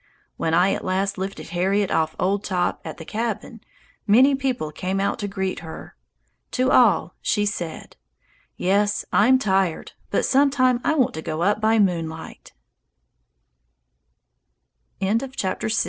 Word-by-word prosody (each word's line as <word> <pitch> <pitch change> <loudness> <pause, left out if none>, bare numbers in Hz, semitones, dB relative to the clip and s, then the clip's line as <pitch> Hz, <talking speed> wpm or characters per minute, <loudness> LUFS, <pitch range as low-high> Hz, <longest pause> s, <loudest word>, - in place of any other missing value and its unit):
When 160 0 0
I 180 +3 +4
at - - -4
last 195 +1 -1
lifted 190 -3 -5
Harriet 190 +3 0
off 160 0 0
old 195 +2 0
Top 180 -2 -1
at - - -7
the 160 - -9
cabin, 225 +2 -4 0.5
many 255 +7 +6
people 255 - -2
came 185 +5 -3
out 200 - -1
to 205 - -3
greet 190 -1 -3
her. 160 -1 -10 0.6
To 255 +1 +1
all 200 -8 +4
she 205 - +1
said, 175 -6 -5 0.6
"Yes, 205 +2 +1
I'm 250 +6 +5
tired, 190 -7 0 0.2
but - - +1
some 280 +2 +4
time 255 -2 +2
I 310 - +1
want 260 -5 +2
to 160 - -5
go 160 +1 -3
up 205 +3 +1
200 Hz, 130 wpm, -23 LUFS, 180-235 Hz, 0.6 s, many